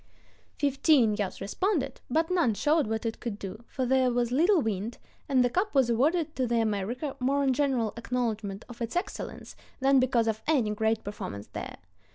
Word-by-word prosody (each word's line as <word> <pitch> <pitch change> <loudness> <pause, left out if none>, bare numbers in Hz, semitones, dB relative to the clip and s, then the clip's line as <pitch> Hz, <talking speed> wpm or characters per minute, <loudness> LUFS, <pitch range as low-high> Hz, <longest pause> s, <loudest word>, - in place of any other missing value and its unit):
Fifteen 275 -5 +3
yachts 205 -2 -3
responded, 275 - -1
but 320 +6 +1
none 330 - +2
showed 300 +3 +2
what 220 +1 -2
it 225 - -3
could 230 -4 -4
do, 205 +3 -7
for 260 - -2
there 260 0 +3
was 240 -1 0
little 340 +8 +4
wind, 220 -2 -2 0.3
and 260 -3 +4
the - - +2
cup 380 - 0
was 260 -3 +4
awarded 310 +7 +1
to 255 -2 0
the 235 0 +1
America 225 +6 -2
more 275 +3 +1
in 265 -1 +3
general 255 -6 +1
acknowledgment 225 -4 -3
of 240 -1 -12
its 230 +5 -3
excellence 355 - -4 0.2
than 270 0 +4
because 245 -3 +2
of 220 -1 -1
any 260 -9 +2
great 220 +1 0
performance 105 - -6
there. - - -6
245 Hz, 185 wpm, -28 LUFS, 220-280 Hz, 0.3 s, little